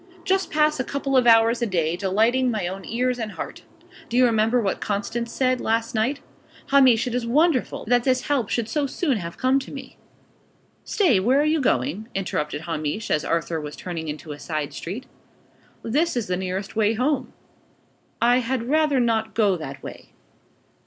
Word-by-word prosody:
"Just 380 0 +1
pass 305 -1 +2
a - - +1
couple 275 0 -2
of 250 -2 +4
hours 230 +1 +5
a 235 - +1
day, 170 -4 0
delighting 220 +8 +2
my 215 -6 -1
own 190 +1 -6
ears 250 +1 -1
and 215 -3 -4
heart. - - -7 0.5
Do 240 - -1
you 255 - +6
remember 225 +1 +2
what 200 -5 -1
Constance 230 +3 -2
said, 255 0 +1
last 230 +2 0
night? 240 +6 0 0.5
Hamish, 260 -5 +5
it 245 - -3
is 245 -1 -1
wonderful, 295 +2 +1
that 245 +1 +2
this 255 -1 +2
help 270 -8 -1
should 235 -2 -1
so 285 +4 -1
soon 275 -2 0
have 170 -3 -6
come 260 +2 +2
to 270 - -9
me!" 275 - -9 0.9
"Stay! 330 - +2
Where 250 +8 +3
are - - +3
you 310 0 +2
going?" 235 -3 0
interrupted 150 -6 -2
Hamish, 160 +4 -3
as 150 - +2
Arthur 165 -1 -1
was 150 0 -7
turning 165 -3 -6
into 150 +1 -6
a 145 - -8
side 155 -3 -4
street. 205 +10 -6 0.8
"This 295 +5 0
is 235 - -1
the 180 - -1
nearest 190 +2 -4
way 215 0 +2
home." 260 +3 -1 0.9
"I 245 +1 +4
had 250 0 -2
rather 305 -3 +3
not 225 -2 0
go 210 -4 +3
that 140 -5 -8
way." - - -10
230 Hz, 185 wpm, -23 LUFS, 190-260 Hz, 0.9 s, you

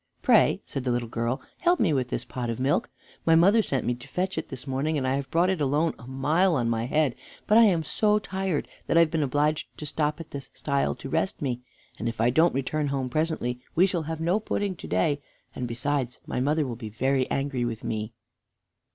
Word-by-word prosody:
"Pray," - - +4
said 135 - -4
the 130 - -1
little 120 -1 0
girl, 115 +4 -2 0.2
"help 350 0 +3
me 175 -8 +3
with 130 -3 +1
this - - -3
pot 125 -2 -4
of 115 - -3
milk. 135 +3 +1 0.3
My 165 - +5
mother 195 +7 +6
sent 135 - -2
me 125 - +1
out 120 - -10
to 120 - -12
fetch 185 +1 -2
it - - -4
this 130 -1 -8
morning, 140 +3 -1
and 130 -2 -1
I 130 - +2
have 140 0 -2
brought 175 +3 +3
it 185 -5 -2
alone 145 +4 +2
a 120 - -12
mile 155 +7 +2
on 120 -4 +1
my 115 +1 -1
head; 150 -2 +2 0.3
but 210 - +3
I 230 0 +8
am 175 -6 +3
so 210 +6 +2
tired 190 -5 -2 0.2
that - - +2
I - - +8
have 160 -2 +3
been 160 - +1
obliged 145 +2 0
to 150 - -6
stop 150 +1 -1
at 165 - -9
this 140 -1 -7
stile 140 -2 0
to 135 - -8
rest 160 +6 0
me, 125 -4 -2 0.4
and 115 - -1
if 115 - -7
I 120 +2 +3
don't 160 +4 +4
return 145 +3 -1
home 135 -2 -1
presently 140 -4 -1 0.2
we 180 - +6
shall 180 -3 -1
have 160 -1 -3
no 175 +6 +2
pudding 205 -3 -2
to - - -9
day, 140 +11 +1 0.3
and, 125 - -4
besides, 125 +1 -2
my - - -3
mother 150 +4 +1
will 125 -3 -4
be 110 -2 -7
very 130 +4 0
angry 135 -3 -1
with 115 -2 -3
me." 110 0 -3
140 Hz, 240 wpm, -26 LUFS, 125-165 Hz, 0.4 s, I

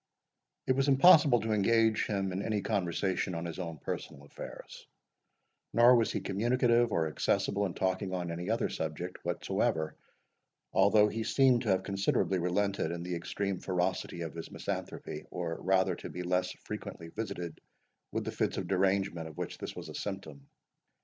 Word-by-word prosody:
It - - +2
was 135 +1 +2
impossible 140 - +7
to 110 +1 -2
engage 110 +1 +3
him 95 -2 -1
in 95 +2 -2
any 105 -1 -1
conversation 95 -2 -1
on 85 +1 -3
his 85 +1 -5
own 85 -3 -4
personal 70 0 -6
affairs; 70 - -10 0.9
nor 120 +2 +7
was 115 -2 +2
he - - -2
communicative 120 +3 +2
or 80 - +1
accessible 100 +5 0
in 90 - -8
talking 95 0 -1
on 90 -2 -2
any 85 +3 -4
other 115 +1 +1
subject 80 +3 -5
whatever, 80 -1 -1 0.8
although 105 +2 +5
he 110 +2 -3
seemed 130 +1 +4
to 115 - -2
have 95 -1 +2
considerably 95 -1 +1
relented 100 +3 0
in 85 0 -4
the 90 0 -4
extreme 95 +2 -2
ferocity 90 -2 -1
of 80 -2 -4
his 85 -1 -7
misanthropy, - - -5
or 85 -2 -4
rather 95 0 +2
to - - -7
be 90 - -5
less 90 +1 0
frequently 85 - -6
visited 85 -5 -5 0.5
with - - -2
the - - -2
fits - - -1
of - - -3
derangement 95 -3 +1
of 80 - -11
which - - -5
this - - -6
was - - -7
a - - -8
symptom. 80 -9 -6
95 Hz, 170 wpm, -31 LUFS, 85-110 Hz, 0.9 s, impossible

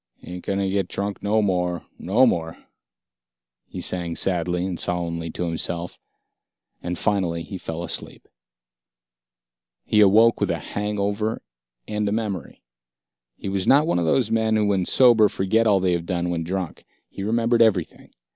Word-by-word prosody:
"Ain't 90 0 -8
gonna 100 0 -1
get 95 -1 0
drunk 100 +1 -4
no 105 +1 +1
more, 90 -3 -1
no 110 +9 +3
more," 80 -8 -1 1.1
he - - -8
sang 85 -2 -4
sadly 90 -1 0
and 90 -3 -4
solemnly 85 -1 -2
to 90 - -4
himself, 85 +1 -3 0.8
and 90 0 -4
finally 90 -6 0
he 95 0 -7
fell 80 0 -5
asleep. - - -6 1.6
He 105 - +2
awoke 110 +3 +5
with - - +1
a - - 0
hangover 105 +1 -2 0.4
and 105 -1 -1
a - - -3
memory. 105 -3 -4 0.7
He - - -8
was 95 -1 -1
not 145 +3 +5
one 160 - +1
of 85 - 0
those 110 +7 +1
men 110 -1 +2
who 105 -1 +2
when 100 -3 +1
sober 115 -3 +5
forget 110 +4 +1
all 100 -2 +4
they 90 -1 +1
have 85 -1 -3
done 90 -1 -1
when 85 -1 -2
drunk. 90 0 -4 0.2
He - - -9
remembered 115 +3 +1
everything. 100 -7 +1
95 Hz, 155 wpm, -23 LUFS, 90-105 Hz, 1.6 s, awoke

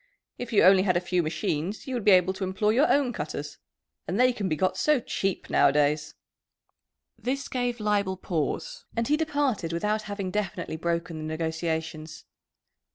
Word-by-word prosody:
If 245 0 -5
you 210 - +4
only 190 +1 +7
had 185 -2 +2
a - - +3
few 180 0 0
machines 165 +4 -2
you 265 - -5
would 240 -3 -2
be 210 - +4
able 185 -1 +5
to 190 +1 -5
employ 190 +3 +1
your 265 +7 +3
own 275 -4 +2
cutters. 150 -3 -5 0.5
And 185 +6 -1
they 255 0 +5
can 205 -5 -2
be 155 - +1
got 185 +5 0
so 300 -3 +3
cheap 195 -4 -2
nowadays." 150 +1 +2 1.0
This 255 +4 -2
gave 245 -2 -2
Leibel 205 -3 0
pause, 450 - -3
and 230 - +1
he 295 - +3
departed 285 - -1
without 210 +6 0
having 200 -2 -3
definitely 205 -5 -3
broken 170 0 -2
the - - -6
negotiations. 160 0 -3
190 Hz, 170 wpm, -27 LUFS, 160-235 Hz, 1.0 s, only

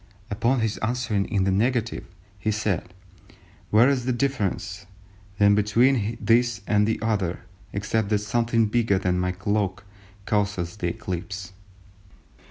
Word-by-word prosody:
Upon 120 +4 +1
his 110 -1 -1
answering 110 -3 0
in 100 -3 0
the 95 - +2
negative, 115 +3 0 0.3
he 100 - -1
said, 105 -5 -1 0.8
'Where 110 +4 +6
is 135 -3 +1
the 130 - +1
difference, 105 -7 -2 0.5
then 100 0 +5
between 115 +2 +2
this 120 0 +2
and 105 0 +2
the 110 - 0
other, 100 -6 -1 0.3
except 105 +1 -1
that 105 - +3
something 115 +2 +1
bigger 110 -2 +2
than 90 -1 0
my 90 0 0
cloak 100 0 -1 0.4
causes 100 -3 -1
the 90 - -2
eclipse? 95 -2 -5
105 Hz, 135 wpm, -25 LUFS, 100-115 Hz, 0.8 s, Where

